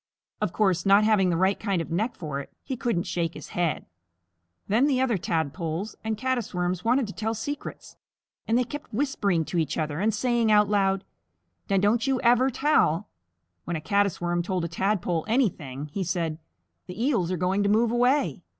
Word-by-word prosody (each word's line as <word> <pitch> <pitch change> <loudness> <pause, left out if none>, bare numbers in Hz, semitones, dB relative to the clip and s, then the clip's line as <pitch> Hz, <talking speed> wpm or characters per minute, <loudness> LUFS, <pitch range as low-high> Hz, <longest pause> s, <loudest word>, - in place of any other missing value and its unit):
Of - - 0
course, 190 -5 +1
not 200 +1 +5
having 210 -4 +3
the 170 - +1
right 190 +3 +2
kind 200 -4 0
of 165 - -5
neck 215 +8 -1
for 150 -4 -4
it, 140 - -8
he 265 - -4
couldn't 230 -8 -1
shake 170 -2 -2
his - - -9
head. 175 -3 -1 0.8
Then 235 +8 +3
the 265 -3 +2
other 260 -3 +2
Tadpoles 165 +3 -2
and 220 -1 -2
Caddis 245 -4 -2
Worms 180 0 -1
wanted 245 +3 +2
to 200 - -7
tell 225 +1 -2
secrets, 285 +6 -6 0.5
and 230 - +3
they 250 - +3
kept 290 +4 -8
whispering 205 - 0
to 175 - -1
each 155 -2 -1
other 155 -1 -2
and 215 +3 +2
saying 235 +1 +1
out 210 -1 +5
loud, 195 -1 +1 0.7
"Now 195 - +3
don't 215 +6 +2
you 265 -2 +1
ever 245 +1 +4
tell." 255 - +2 0.6
When 175 - -2
a - - -2
Caddis 200 +1 +1
Worm 175 0 0
told 180 -1 -2
a - - -1
Tadpole 175 -1 -1
anything, 155 - 0
he 195 - -1
said, 170 -3 -2 0.5
"The 180 +2 -8
Eels 230 - +1
are 185 - -1
going 185 +4 +1
to 200 - +2
move 225 +2 +3
away." 250 +4 +2
200 Hz, 195 wpm, -26 LUFS, 175-235 Hz, 0.8 s, not